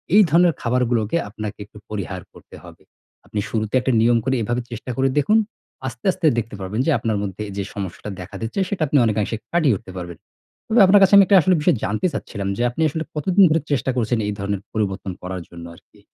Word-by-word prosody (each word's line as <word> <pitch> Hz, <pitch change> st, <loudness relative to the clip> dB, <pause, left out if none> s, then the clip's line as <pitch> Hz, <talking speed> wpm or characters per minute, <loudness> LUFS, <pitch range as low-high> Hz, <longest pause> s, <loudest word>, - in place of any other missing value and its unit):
এই 215 Hz, -, +9 dB
ধরনের 170 Hz, +1 st, +4 dB
খাবারগুলোকে 120 Hz, +1 st, 0 dB
আপনাকে 105 Hz, -1 st, -6 dB
একটু 105 Hz, -, -17 dB
পরিহার 95 Hz, -3 st, -5 dB
করতে -, -, -15 dB
হবে। -, -, -14 dB, 0.4 s
আপনি 105 Hz, -, -4 dB
শুরুতে 110 Hz, 0 st, -2 dB
একটা 130 Hz, +1 st, 0 dB
নিয়ম 120 Hz, +1 st, +4 dB
করে 130 Hz, 0 st, 0 dB
এভাবে 120 Hz, +3 st, -1 dB
চেষ্টা 120 Hz, +2 st, -6 dB
করে 135 Hz, 0 st, +2 dB
দেখুন, 210 Hz, +10 st, +4 dB, 0.5 s
আস্তে, 120 Hz, -, -9 dB
আস্তে 180 Hz, -2 st, -4 dB
দেখতে 115 Hz, -2 st, -3 dB
পারবেন 95 Hz, +5 st, -4 dB
যে, 165 Hz, -, +2 dB
আপনার 110 Hz, -2 st, -1 dB
মধ্যে 100 Hz, +1 st, -5 dB
এইযে 100 Hz, 0 st, -4 dB
সমস্যাটা 100 Hz, +1 st, -6 dB
দেখা 90 Hz, -, -10 dB
দিচ্ছে, 115 Hz, -, -3 dB
সেটা 200 Hz, -5 st, -3 dB
আপনি 145 Hz, -, +2 dB
অনেকাংশে 110 Hz, 0 st, 0 dB, 0.2 s
কাটিয়ে 155 Hz, -10 st, +3 dB
উঠতে 95 Hz, -, -13 dB
পারবেন। 85 Hz, -2 st, -8 dB, 0.5 s
তবে 220 Hz, 0 st, +4 dB
আপনার 195 Hz, +1 st, +6 dB
কাছে 195 Hz, -, +4 dB
আমি 200 Hz, -, +9 dB
একটা 195 Hz, 0 st, +5 dB
আসলে 185 Hz, +2 st, +3 dB
বিষয় 150 Hz, -, +3 dB
জানতে 110 Hz, -, 0 dB
চাচ্ছিলাম 100 Hz, -3 st, -5 dB
যে, -, -, -2 dB
আপনি 140 Hz, +7 st, -5 dB
আসলে 160 Hz, +2 st, -3 dB
কতদিন 185 Hz, +6 st, +3 dB
ধরে 160 Hz, 0 st, +2 dB
চেষ্টা 130 Hz, -1 st, +1 dB
করছেন 120 Hz, 0 st, +1 dB
এই 105 Hz, -, -1 dB
ধরনের 100 Hz, 0 st, -2 dB
পরিবর্তন 95 Hz, -3 st, -2 dB
করার 90 Hz, 0 st, -5 dB
জন্য 85 Hz, -1 st, -10 dB
আরকি? -, -, -23 dB
115 Hz, 210 wpm, -21 LUFS, 100-155 Hz, 0.5 s, এই